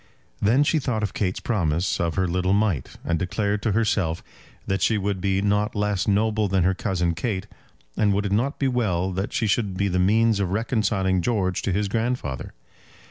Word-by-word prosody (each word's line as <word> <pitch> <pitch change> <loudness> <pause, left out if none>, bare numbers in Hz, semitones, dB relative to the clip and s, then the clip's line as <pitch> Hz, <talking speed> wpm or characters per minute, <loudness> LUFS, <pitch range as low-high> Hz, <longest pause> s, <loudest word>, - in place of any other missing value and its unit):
Then 120 +8 +4
she 155 +2 +2
thought 120 -6 -2
of 100 - -2
Kate's 95 -3 -1
promise 90 -5 0
of 85 -1 -1
her 95 -1 +1
little 90 +2 +1
mite, 100 - 0
and 85 -1 0
declared 100 +3 -1
to 110 - 0
herself 100 -6 0 0.4
that 95 -1 -1
she 110 +5 +2
would 100 -1 -1
not 100 +2 +1
be - - -7
less 105 -2 0
noble 105 +1 +2
than 95 -2 +1
her 95 +2 +3
cousin 90 -2 -1
Kate. 100 0 -3 0.5
And 105 -1 +2
would 100 +1 0
it 100 - -2
not 120 +8 0
be 135 - +1
well 95 -8 0
that 95 +2 -3
she - - 0
should 100 -2 0
be 100 +1 +1
the 90 0 0
means 110 +3 +3
of 100 -3 0
reconciling 100 -3 0
George 95 -3 0
to 100 - -1
his 100 +3 0
grandfather? 110 - -2
100 Hz, 195 wpm, -24 LUFS, 95-110 Hz, 0.5 s, Then